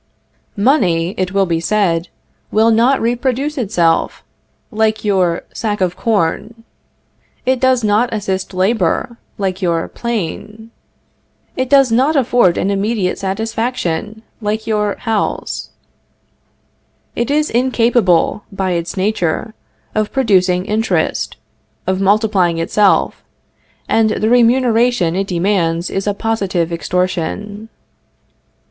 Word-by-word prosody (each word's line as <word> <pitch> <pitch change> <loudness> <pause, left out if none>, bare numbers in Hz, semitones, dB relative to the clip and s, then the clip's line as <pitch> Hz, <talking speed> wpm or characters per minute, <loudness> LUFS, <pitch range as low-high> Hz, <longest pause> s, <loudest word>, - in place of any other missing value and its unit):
Money, 190 - +2
it 185 -1 -2
will 195 0 +2
be 165 -2 -1
said, 170 -2 0 0.4
will 220 +2 +3
not 240 +5 +3
reproduce 255 +5 -1
itself, 185 - 0 0.5
like 220 -1 0
your 185 -4 +1
sack 210 -2 -2
of 180 -2 0
corn; 220 +3 -1 0.8
it 260 0 +1
does 260 -2 +2
not 215 +3 +2
assist 195 -3 -3
labor, 190 +3 0 0.2
like 190 -1 -2
your 170 -3 0
plane; 220 0 -5 0.8
it 260 -1 -2
does 275 -3 +5
not 265 +7 +2
afford 240 -9 +3
an 200 - 0
immediate 200 -1 -1
satisfaction, 220 0 -3 0.2
like 215 +1 -2
your 210 -2 0
house. 225 -3 -2 1.5
It 235 +3 -1
is 300 +1 +1
incapable, 230 -6 +2
by 190 -1 -2
its 170 +2 -3
nature, 195 +1 -1 0.4
of 215 -1 -1
producing 185 -8 +2
interest, 220 +2 -1 0.5
of 190 0 -1
multiplying 195 -4 +2
itself, 195 +4 +1 0.6
and 225 -1 +3
the 215 0 0
remuneration 240 -6 +3
it 195 +1 -1
demands 175 -2 0
is 195 +1 -3
a 205 - 0
positive 195 -7 -1
extortion. 185 +5 -3
210 Hz, 110 wpm, -16 LUFS, 185-230 Hz, 1.5 s, does